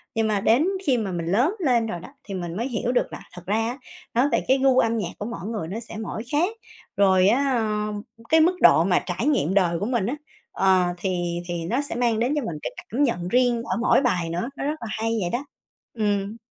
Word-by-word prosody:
Nhưng 225 -1 +1
mà 205 -2 0
đến 250 - +3 0.2
khi 260 -4 +3
mà 210 -4 -2
mình 170 -2 -3
lớn 240 - +2
lên 245 -8 +2
rồi 175 -5 -4
đó, 185 - -11
thì 200 - -8
mình 175 -2 -4
mới 235 +4 -1
hiểu 240 0 -1
được 250 - 0
là - - -6
thật 180 - -9
ra 205 +3 0
á 245 +3 -4 0.4
nói 250 +5 +3
về - - +1
cái 265 - +4
gu 265 -1 +4
âm 230 -1 +2
nhạc 180 -5 -2
của 205 - -5
mỗi 205 -4 -6
người 210 -8 -3
nó 205 +6 -4
sẽ 225 -2 -9
mỗi 220 0 -5
khác, 320 +6 +2 0.5
rồi 190 -1 +5
á, 270 +4 +3
ơ, 210 -1 -1 0.4
cái 320 - +5
mức 355 +3 +4
độ 160 - +7
mà 180 -1 +3
trải 195 +9 -2
nghiệm 190 - +2
đời 175 -4 +2
của 205 - -2
mình 235 -5 0
á, 250 - -1 0.4
ờ, 190 -2 +3
thì 175 -2 -2
thì 175 - -3 0.2
nó 250 +5 +1
sẽ 285 - -5
mang 235 -2 +1
đến 250 +5 +1
cho 295 - 0
mình 165 -6 -4
cái - - -3
cảm 270 +6 -2
nhận 180 -9 0
riêng 245 +1 +2
ở - - -2
mỗi 250 - +4
bài 180 -10 0
nữa, 175 +10 -2
nó - - -4
rất 300 +2 -1
là 230 - -5
hay 225 +1 -1
vậy 175 - -1
đó. 255 +4 -2 0.5
Ừm. 205 -1 -1
220 Hz, 250 wpm, -24 LUFS, 185-250 Hz, 0.5 s, độ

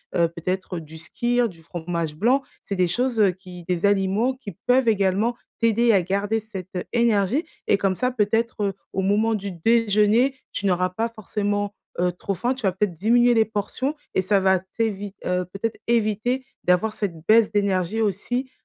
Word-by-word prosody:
heu, 170 -1 +4
peut-être 180 +2 -3
du 160 0 -11
skyr, 240 +9 0
du 170 -6 -13
fromage 165 -1 -4
blanc, 245 - +3 0.2
c'est 200 - -4
des 185 -1 +2
choses, 240 +6 0
heu, 205 -2 +6
qui 180 -1 -12
des 180 +1 0
aliments 200 +5 +2
qui 255 -6 -9
peuvent 250 0 +3
également 205 +2 +2 0.2
t'aider 230 +1 +3
à 195 -4 +4
garder 200 +5 0
cette, 200 -4 -8
heu, 180 - -2
énergie 235 - +2 0.2
et 200 - +4
comme 195 -1 +1
ça, 250 +6 0
peut-être, 225 0 0
heu, 195 - -1 0.2
au 190 - 0
moment 215 +3 +2
du 200 -1 -4
déjeuner, 225 +6 +3 0.2
tu 205 - -4
n'auras 185 -1 +2
pas 225 +6 -2
forcément, 205 -1 -2 0.2
heu, 180 0 +2
trop 180 +3 -4
faim. 240 +7 -1
Tu 255 - -10
vas 190 - +3
peut-être 190 -1 -1
diminuer 240 +6 +4
les 220 -1 +4
portions 220 +6 -2 0.2
et 190 - +2
ça 200 +1 +3
va 190 0 +4
t'évite 205 +1 -3
heu, 180 0 0
peut-être 200 +5 -4
éviter 235 +3 0 0.2
d'avoir 180 +5 +2
cette 205 -5 -2
baisse 220 0 +5
d'énergie 200 0 0
aussi, 235 +6 -1
205 Hz, 185 wpm, -23 LUFS, 185-230 Hz, 0.2 s, heu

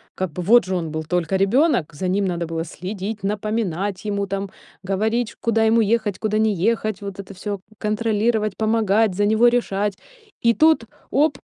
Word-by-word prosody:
Как 185 -4 -3
бы 180 - -5
вот 235 +6 +5
же 185 0 -2
он 165 -3 -2
был 160 0 -3
только 180 +1 0
ребёнок, 195 - +2
за 185 +4 -3
ним 195 +2 +1
надо 175 -2 -2
было 165 0 -3
следить, 195 +4 -6
напоминать 205 -2 -2
ему 200 -1 -1
там, 195 0 -3 0.4
говорить, 220 +4 0
ш - - -15
куда 225 -1 +2
ему 225 +1 +4
ехать, 215 -2 0
куда 215 -1 0
не 220 -1 +3
ехать. 215 -3 0
Вот 200 -1 -7
это 195 0 -8
всё 200 +1 -5 0.2
контролировать, 215 0 0
помогать, 220 -1 +2
за 205 +2 +2
него 220 +3 +4
решать. 205 -4 -1 0.5
И 235 - +6
тут, 315 -2 +4 0.3
оп, 285 -1 +2
205 Hz, 180 wpm, -22 LUFS, 190-225 Hz, 0.5 s, И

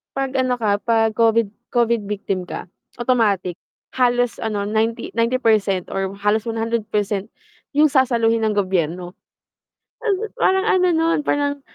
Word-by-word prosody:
'pag 270 -1 -1
ano 255 -1 +2
ka, 205 -3 +1
'pag 225 0 +2
Covid- 230 -2 +3 0.2
Covid 235 -3 +2
victim 195 -3 -3
ka 180 - -7 0.3
automatic 205 -8 +1 0.4
halos 245 -1 +2
ano, 210 -2 -2
90- 220 +3 -1
90% 220 -6 +1
or 195 0 -2
halos 210 +2 +1
100% 220 -3 -1 0.5
yung 300 0 +4
sasaluhin 235 -4 +2
ng 210 - 0
gobyerno. 180 -2 -1 1.2
Parang 380 -5 +2
ano 365 -1 +3
nun, 325 -1 +2
parang 285 0 0
225 Hz, 125 wpm, -21 LUFS, 205-245 Hz, 1.2 s, yung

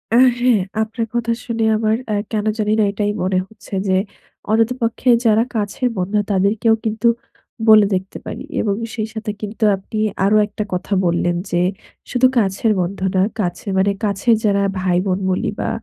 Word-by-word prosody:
আ - - +6 0.2
হ্যাঁ। 240 -5 +3 0.2
আপনার 225 +1 -2
কথা 235 -1 0
শুনে 230 -2 -2
আমার 220 0 +1 0.2
আ - - +1 0.2
কেন 215 -1 -1
জানি 210 -1 0
না - - +4
এটাই 205 0 -1
মনে 185 0 +1
হচ্ছে 220 -1 -16
যে 190 - +2 0.6
অন্তত 225 +2 +3
পক্ষে 230 +2 0 0.2
যারা 225 0 +4
কাছের 215 +4 -1
বন্ধু, 190 +3 -1
তাদেরকেও 205 +4 +2
কিন্তু 220 +2 0 0.6
বলে 215 -1 +8
দেখতে 190 +1 -4
পারি। 250 - -6 0.2
এবং 200 -2 0 0.2
সেই 220 -2 -2
সাথে 220 -2 -4
কিন্তু 215 +1 -5
আপনি 195 +3 -8 0.3
আরো 205 +2 +3
১ 205 - -15
টা - - +2
কথা 180 +3 -2
বললেন 175 0 +1 0.2
যে 175 0 +2 0.5
শুধু 255 0 +4
কাছের 205 +1 +2
বন্ধু 190 +2 -3
না, 185 - +4 0.2
কাছে 180 +1 -3
মানে 195 +1 +3
কাছের 205 +3 +2
যারা 200 -1 +3 0.2
ভাই-বোন 185 +1 0
বলি 185 - 0
বা - - -1
210 Hz, 175 wpm, -19 LUFS, 190-225 Hz, 0.6 s, বলে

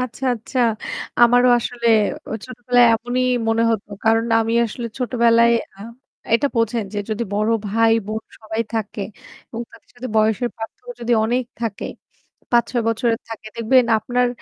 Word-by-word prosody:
আচ্ছা, 255 +1 -4
আচ্ছা। 235 +4 -6 0.6
আমারও 245 +1 +6
অ - - +6
আসলে 235 0 -4 0.6
ছোটবেলায় 245 0 +2
এমনই 245 +3 -1 0.2
মনে 225 +1 +2
হত। 220 -3 0 0.2
কারণ 225 +1 +3 0.2
আমি 225 +1 -1
আসলে 235 +2 -6
ছোটবেলায় 235 -1 +3 0.2
আ - - -21 0.6
এটা 260 +5 +3
বোঝেন 230 -1 +1
যে - - -1
যদি 215 +2 -1
বড় 215 +2 +1 0.2
ভাই, 225 +2 +3
বোন 220 +1 -4 0.2
সবাই 220 +1 -4
থাকে 215 -2 -3 0.5
এবং 230 +1 -5
তাদের 250 +1 -10
বয়সের 220 +3 +2
পার্থক্য 325 - -8
যদি 240 +1 0
অনেক 245 +3 0 0.2
থাকে, 225 -4 -3 0.7
৫ 240 -1 +5
৬ 240 -2 0
বছরের 230 0 0
থাকে। 220 -1 -8
দেখবেন 235 +2 +3
আপনার 245 +3 0
230 Hz, 150 wpm, -20 LUFS, 225-245 Hz, 0.7 s, আমারও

